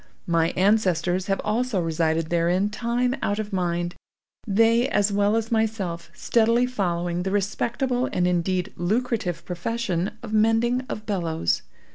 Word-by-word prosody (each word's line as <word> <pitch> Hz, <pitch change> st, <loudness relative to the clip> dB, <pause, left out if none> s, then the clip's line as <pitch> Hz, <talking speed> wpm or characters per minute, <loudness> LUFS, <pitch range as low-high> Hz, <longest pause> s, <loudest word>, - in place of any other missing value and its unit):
My 165 Hz, -1 st, +2 dB
ancestors 185 Hz, -2 st, +2 dB
have 195 Hz, -1 st, 0 dB
also 225 Hz, 0 st, 0 dB
resided 165 Hz, -1 st, 0 dB
therein 175 Hz, +4 st, +2 dB
time 245 Hz, +3 st, 0 dB
out 205 Hz, -, 0 dB
of 215 Hz, -1 st, -4 dB
mind—they, 195 Hz, +6 st, 0 dB
as 205 Hz, -3 st, +2 dB
well 205 Hz, +1 st, +2 dB
as 225 Hz, 0 st, -1 dB
myself, 210 Hz, -7 st, -1 dB
steadily 230 Hz, +1 st, +2 dB
following 175 Hz, -7 st, -1 dB
the 190 Hz, -, -2 dB
respectable 240 Hz, +6 st, -1 dB
and 180 Hz, -, +1 dB
indeed 180 Hz, +2 st, 0 dB
lucrative 190 Hz, -3 st, -1 dB
profession 185 Hz, 0 st, -2 dB
of 220 Hz, -2 st, -6 dB
mending 225 Hz, +3 st, +3 dB
of 215 Hz, -, -5 dB
bellows. 160 Hz, -, 0 dB
200 Hz, 130 wpm, -24 LUFS, 175-225 Hz, -, mending